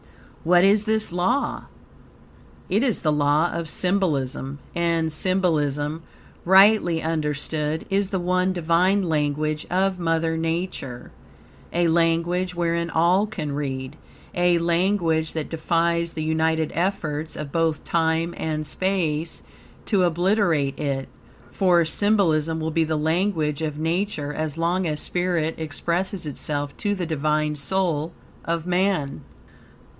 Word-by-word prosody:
What 175 +2 +5
is 205 +2 +4
this 220 -2 +1
law? 185 +11 0 1.0
It 200 +4 +1
is 250 -5 0
the 155 - +2
law 150 +3 +2
of 165 -2 -3
symbolism, 145 -8 -1 0.2
and 165 -2 0
symbolism, 155 -4 0 0.4
rightly 190 -2 +5
understood, 155 0 -2
is 195 0 +1
the 195 -2 -1
one 180 +1 +1
Divine 180 +3 +2
language 155 -1 -1
of 185 +1 +1
Mother 165 -1 0
Nature, 165 -6 -4 0.6
a 175 0 +2
language 170 +2 +1
wherein 170 0 0
all 175 +6 +3
can 160 -9 -5
read, 135 -1 -4 0.4
a 175 0 +3
language 170 -2 +1
that 160 -2 -4
defies 170 +1 0
the 155 - -3
united 160 0 0
efforts 160 -4 -2
of 150 -2 -6
both 165 -2 0
time 165 0 0
and 155 -1 -3
space 165 -2 -2 0.4
to 200 -4 +2
obliterate 175 -5 +1
it, 135 -2 -2 0.4
for 175 -3 +3
symbolism 160 -4 +1
will 160 0 -2
be 165 +1 +2
the 155 0 -1
language 160 -1 0
of 150 -2 -3
Nature 160 -2 -1
as 155 0 -3
long 175 +2 0
as 150 -1 -2
spirit 175 -3 0
expresses 170 +4 -2
itself 145 0 -3
to 205 -1 -1
the 185 -3 -3
Divine 150 -1 0
soul 160 +1 -1 0.3
of 165 -1 -2
man. 180 -5 0
165 Hz, 125 wpm, -23 LUFS, 155-180 Hz, 1.0 s, What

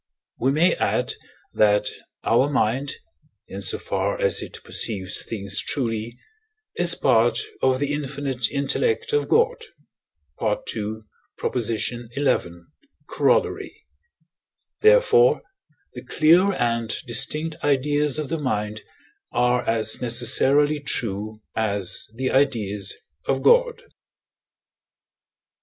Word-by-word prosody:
We 130 +3 +2
may 160 +5 +3
add - - -1 0.4
that 105 -1 +3 0.4
our 125 +5 +2
mind, 135 +1 0 0.5
in - - -7
so - - 0
far - - -2
as 485 -2 +1
it - - -8
perceives 95 -5 -1
things 100 -3 -1
truly, 115 -3 -2 0.6
is - - +4
part - - +2 0.2
of 130 -1 +2
the 145 0 -1
infinite 140 -4 -2
intellect 445 - -1
of 440 - 0
God 470 +1 +2 0.8
(II. 110 - -3 0.4
xi. 120 0 -1 1.1
Coroll.); - - +1 1.1
therefore, 475 +1 +4 0.5
the 125 - -9
clear 170 +8 +4
and 115 - -1 0.2
distinct 155 +7 0
ideas 145 +1 +1
of 155 -3 -4
the 165 0 -2
mind 110 -5 -3 0.5
are 125 +1 +1
as 110 -1 +1
necessarily 135 +5 +3
true 110 -5 -3
as 100 -4 0
the 130 +2 -2
ideas 105 -8 0 0.3
of 135 0 0
God. 480 -1 +3
130 Hz, 100 wpm, -23 LUFS, 110-155 Hz, 1.1 s, is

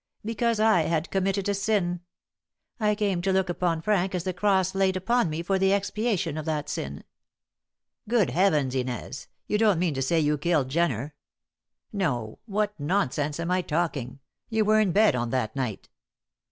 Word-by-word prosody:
"Because 230 0 0
I 215 -5 +4
had 165 0 -1
committed 195 +1 0
a 205 - +1
sin. 195 -4 0 0.8
I 210 -1 +2
came 200 -4 0
to 190 +2 0
look 190 -1 +1
upon 170 -2 -1
Frank 190 -2 +1
as 175 - -2
the 185 0 -2
cross 190 0 +1
laid 190 -1 +1
upon 235 +1 +1
me 155 +2 -3
for 190 +2 0
the 190 +1 +3
expiation 200 -5 -1
of 155 - -6
that 150 -2 -2
sin." 70 - -5 1.1
"Good 230 -5 +2
Heavens, 155 -8 +2
Inez! 130 +1 -4 0.2
You 210 - 0
don't 215 -5 +4
mean 170 -2 0
to 135 - -3
say 165 +5 +2
you 150 -1 +1
killed 150 -4 +1
Jenner? 150 -3 0 0.8
No! 125 - -2
What 210 0 0
nonsense 145 -2 -1
am 170 +1 -2
I 185 0 +2
talking? 150 -7 -2 0.3
You 220 -2 +1
were 215 +1 +4
in 210 -4 +2
bed 210 -5 +4
on 120 -1 -1
that 125 -2 -2
night." 125 -6 -3
180 Hz, 175 wpm, -26 LUFS, 150-200 Hz, 1.1 s, I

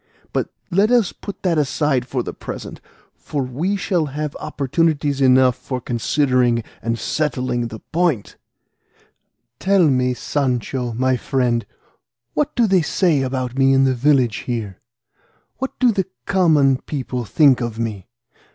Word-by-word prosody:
But - - -1 0.2
let 200 +5 +3
us 240 -6 +3
put 200 - -9
that 170 -4 +2
aside 140 -3 0
for 130 -2 -2
the - - -6
present, - - -8 0.3
for 145 -3 -4
we 150 +11 -2
shall 175 -5 0
have 150 +1 -4
opportunities 145 0 0
enough 130 -1 +5
for 130 0 -5
considering 125 0 +1 0.2
and 115 0 -1
settling 125 -1 -1
the 110 -1 -9
point; 165 - 0 1.2
tell 190 -3 +4
me, 125 -2 +1
Sancho 125 -3 -2
my 130 +2 +1
friend, 120 -3 0 0.7
what 300 - -1
do 240 - +4
they 190 -4 +3
say 160 -2 +1
about 130 -1 -3
me 135 0 +5
in 135 0 +4
the 135 -1 +3
village 130 -3 +2
here? 110 -6 -3 0.8
What 265 0 -4
do 250 -2 +4
the 195 -4 -1 0.2
common 155 -9 +3
people 130 -4 -4
think 130 +2 +4
of 120 -2 -3
me? 110 -5 -4
135 Hz, 140 wpm, -20 LUFS, 125-160 Hz, 1.2 s, enough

